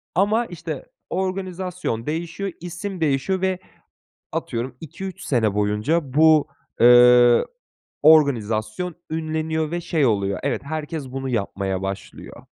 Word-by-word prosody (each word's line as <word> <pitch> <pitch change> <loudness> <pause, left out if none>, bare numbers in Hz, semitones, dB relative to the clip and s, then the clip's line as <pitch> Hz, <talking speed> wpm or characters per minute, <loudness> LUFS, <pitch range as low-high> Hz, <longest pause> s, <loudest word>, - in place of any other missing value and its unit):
Ama, 210 +6 +2
işte, 175 - -7 0.2
organizasyon 185 -9 -3
değişiyor, 170 +5 -3
isim 175 +2 -6
değişiyor 155 +5 0
ve 190 -1 0 0.7
atıyorum, 120 +2 -4
2-3 185 +4 -8
sene 110 -6 +1
boyunca 105 +9 0
bu, 155 0 +5 0.3
eee, 120 0 +7 0.6
organizasyon 140 0 +3
ünleniyor 160 0 -2
ve 175 0 -2
şey 155 -4 +1
oluyor, 100 -3 0
evet, 140 - -1
herkes 150 -2 -5
bunu 135 0 -4
yapmaya 100 -4 -2
başlıyor. 95 0 -7
155 Hz, 110 wpm, -22 LUFS, 120-175 Hz, 0.7 s, eee